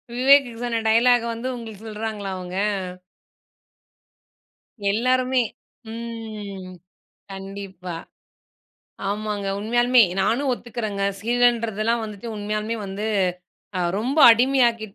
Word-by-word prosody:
விவேக் 270 +2 +6 0.2
சொன்ன 230 -2 -1
டயலாக்க 240 +1 +5
வந்து 230 +3 -5
உங்களுக்கு 220 -3 -9
சொல்றாங்களா 215 -2 -4
அவங்க? 180 0 -7 2.4
எல்லாருமே 255 +3 +2 0.5
ம் 215 -5 -7 0.6
கண்டிப்பா. 195 -2 -7 1.1
ஆமாங்க 205 -1 -2
உண்மையாலுமே 240 +3 +4 0.2
நானும் 260 +8 +1
ஒத்துக்கிறேங்க. 220 -5 -4 0.2
சீரியலன்றதெல்லாம் 230 -1 +1
வந்துட்டு 215 +1 -7
உண்மையாலுமே 215 +2 -2
வந்து 200 +3 -4 0.7
அ - - 0 0.2
ரொம்ப 260 +8 -1
அடிமையாக்கிட்டு 235 -3 +3
225 Hz, 85 wpm, -23 LUFS, 205-240 Hz, 2.4 s, விவேக்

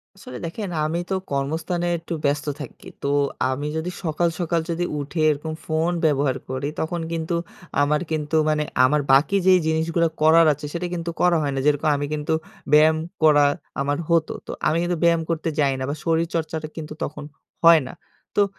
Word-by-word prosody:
আসলে 125 -10 -9
দেখেন 195 +4 -5 0.2
আমি 165 +3 -1
তো 190 - 0 0.2
কর্মস্থানে 160 +5 -1
একটু 165 +1 -6
ব্যস্ত 145 +1 +1 0.2
থাকি। 135 - -10 0.2
তো - - 0 0.4
আমি 145 +3 -2
যদি 165 +3 -3
সকাল, 170 +1 +1
সকাল 170 -1 0
যদি 170 +1 -1
উঠে 145 +3 -3
এরকম 155 +2 -2
ফোন 160 +2 0
ব্যবহার 140 -3 +2
করি 130 +2 -2
তখন 170 +1 -2
কিন্তু 165 +1 -2 0.5
আমার 150 +1 +2
কিন্তু 155 0 -1
মানে 150 0 +1 0.2
আমার 150 +3 +2
বাকি 150 +9 +4
যে 185 - +8
জিনিসগুলো 165 +1 +1
করার 160 +2 +6
আছে 150 +1 -9
সেটা 175 +1 -2
কিন্তু 170 -1 -3
করা 175 -2 +4
হয় 145 -2 -1
না। - - -1
যেরকম 150 +1 +2
আমি 145 - -2
কিন্তু 150 +1 -1 0.4
ব্যায়াম 155 +1 +6 0.3
করা 145 -2 +6 0.4
আমার 145 +1 0
হত। 165 -2 +3 0.2
তো - - -4 0.2
আমি 155 - +2
কিন্তু 175 0 -1
ব্যায়াম 170 -1 +4
করতে 165 0 -1
যাই 140 -2 +3
না - - -3
বা 145 - -2
শরীরচর্চাটা 160 -1 -1
কিন্তু 155 -1 -6
তখন 150 0 -5 0.4
হয় 165 -2 +8
না। - - -9 0.5
তো - - +5
160 Hz, 180 wpm, -23 LUFS, 145-170 Hz, 0.5 s, যে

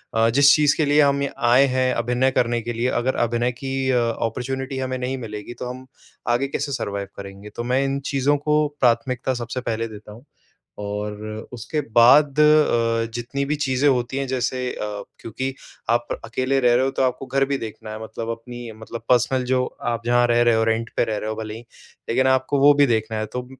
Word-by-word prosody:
अ, 115 0 +4
जिस 140 +4 +6
चीज़ 150 -1 +3
के 155 - +2
लिए 145 +1 +4
हम 140 -1 +3
ये 140 - -1 0.2
आए 130 +3 +6
हैं, 130 0 +2
अभिनय 125 +3 +1
करने 120 -2 +1
के 120 +1 -4
लिए 120 +2 -1
अगर 130 +2 0
अभिनय 120 +1 0
की 135 +1 -3
अ, 125 - +3
ऑपर्च्युनिटी 125 +4 -2
हमें 130 0 -2
नहीं 130 +1 -3
मिलेगी, 105 +2 -7
तो 125 - -6
हम 130 +1 -8 0.4
आगे 120 +3 +1
कैसे 140 +1 -3
सरवाइव 100 -6 -3
करेंगे? 100 +1 -9
तो 120 - -6
मैं 125 +3 +1
इन 135 0 -1
चीज़ों 140 +1 +2
को 150 +1 +1
प्राथमिकता 125 +1 +1
सबसे 125 +2 -4
पहले 115 0 -1
देता 105 -1 -11
हूँ। 115 +6 -14 0.6
और 105 +1 -4 0.4
उसके 125 +6 -3 0.2
बाद 140 +5 +6
अ, 120 -7 +3
जितनी 120 +4 -3
भी 150 +2 -1
चीज़ें 130 +1 +2
होती 125 -1 0
हैं 135 0 -1
जैसे 130 0 -1
अ, 105 -1 -5 0.2
क्योंकि 130 +4 -4 0.4
आप 120 0 +1 0.2
अकेले 130 +4 0
रह 120 -2 +4
रहे 125 +2 +3
हो 135 - +1
तो 135 - -1
आपको 130 +1 -1
घर 135 +1 +1
भी 140 0 -1
देखना 110 -2 -8
है 110 +1 -7
मतलब 110 +1 -6
अपनी 120 +1 -7
मतलब 110 +1 -8
पर्सनल 125 +1 +3
जो 125 0 +1 0.3
आप 115 -1 -3
जहाँ 120 0 +4
रह 120 0 +2
रहे 120 -1 +4
हो, 110 0 +2
रेंट 115 +1 -1
पे - - +3
रह 110 -2 -2
रहे 110 +1 -3
हो - - -2
भले 110 -1 -5
ही। 115 - -8 0.5
लेकिन 130 +3 +2
आपको 130 +2 +2
वो 145 +1 +7
भी 145 0 +5
देखना 110 -2 0
है 110 - -2
तो 125 +3 -6
125 Hz, 215 wpm, -22 LUFS, 115-135 Hz, 0.6 s, वो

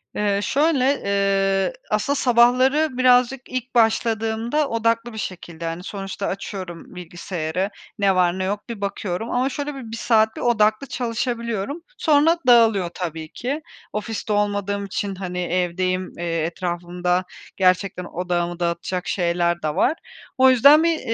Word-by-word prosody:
Eee, 205 -1 +1
şöyle, 280 -1 +2 0.7
ııı, 180 - -3 0.2
aslında 215 +7 0
sabahları 255 +3 +3
birazcık 255 0 +4
ilk 255 0 -5
başladığımda 225 +4 +1
odaklı 230 +1 0
bir - - -8
şekilde, 170 -5 -6
hani, 165 +2 -4
sonuçta 195 0 -5
açıyorum 185 -3 -6
bilgisayarı, 175 +1 -4 0.3
ne 195 -2 +3
var 180 0 +2
ne - - -1
yok 205 +4 -3
bir 225 -4 -6
bakıyorum 200 +1 -3
ama 255 +2 +1
şöyle 290 +1 -4
bir 245 -5 -8
1 230 - -5
saat 220 -1 +2
bir - - -6
odaklı 215 +1 +2
çalışabiliyorum. 235 - -3 0.2
Sonra 310 +2 +4
dağılıyor 225 -7 +5
tabii 165 -3 -5
ki. 280 +6 -3 0.3
Ofiste 215 0 -3
olmadığım 205 -1 -1
için, 200 0 -3
hani, 180 -1 -5
evdeyim, 185 +1 -1
eee, 170 -1 -2
etrafımda 175 +1 -2 0.3
gerçekten 185 0 +2
odağımı 175 0 -2
dağıtacak 175 +1 -2
şeyler 175 -1 0
de 155 -1 -2
var. - - +3 0.4
O 260 0 +6
yüzden 280 +5 +7
bir, 335 -1 +2
205 Hz, 140 wpm, -22 LUFS, 180-245 Hz, 0.7 s, yüzden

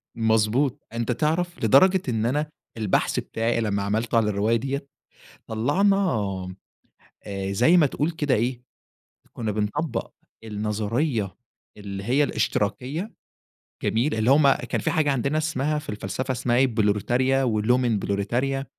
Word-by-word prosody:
مضبوط. 115 +5 +1
أنت 115 +1 -1
تعرف 160 +4 -1
لدرجة 185 - +5
إن 115 -2 0
أنا 150 +5 0 0.3
البحث 105 -4 +1
بتاعي 115 +1 -1
لمّا 100 -2 -1
عملته 110 +4 -1
على 110 -2 +3
الرواية 105 +3 +1
ديّة، 135 +4 -3 0.6
طلّعنا 145 - +2 1.3
آآ، 100 -1 -3
زي 125 - +4
ما 160 - +5
تقول 150 +4 -1
كده 145 -5 0
إيه، 120 +2 -1 0.7
كُنّا 110 -3 -3
بنطبّق 110 +10 -2 0.3
النظرية 110 +2 -2 0.4
اللي 100 -1 -7
هي 135 +6 +3
الاشتراكية، 135 - -2 0.7
جميل؟ 120 +6 +1
اللي 110 +4 +2
هم 140 -1 +6
كان - - -3
في - - 0
حاجة 155 -3 +2
عندنا 140 +3 0
اسمها 150 -1 0
في 150 - -11
الفلسفة 105 +5 -3
اسمها 120 -1 0
إيه، 135 - +5
بروليتاريا 120 +4 +1
ولومن 120 0 +2
بروليتاريا 125 +8 -1
120 Hz, 130 wpm, -24 LUFS, 110-145 Hz, 1.3 s, هم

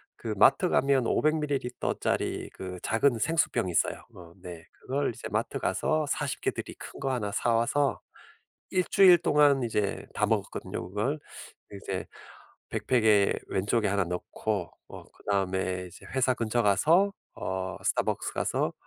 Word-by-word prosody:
그 - - -4
마트 - - +5
가면 135 -3 +2
500 155 +1 +2
밀리리터짜리 140 -4 -2
그 90 -1 -7
작은 120 +2 +2
생수병이 115 - +1
있어요. 85 - 0
어 85 -2 -13
네 85 -2 -9
그걸 135 0 -2
이제 - - -8
마트 - - -1
가서 155 -1 0
40 145 -1 -2
개들이 - - -3
큰 - - -10
거 135 -1 -1
1 105 -5 -2
사 120 +2 +1
와서 135 +5 +1 0.7
1 185 -1 +1
주일 185 -3 +7
동안 145 -4 +4
이제 105 -4 -1
다 - - +1
먹었거든요 90 - -3
그걸. 110 +11 -2 0.5
이제 95 -1 -5 0.6
백팩에 110 -5 +3
왼쪽에 105 +3 0
1 100 0 +1
넣고 90 +2 -3 0.2
어 - - -10
그다음에 95 -2 -2
이제 85 - -14
회사 130 -1 +3
근처 120 +1 0
가서 165 - +4 0.2
어 95 0 -4
Starbucks - - -1
가서 - - -1
115 Hz, 280 characters per minute, -28 LUFS, 95-140 Hz, 0.7 s, 주일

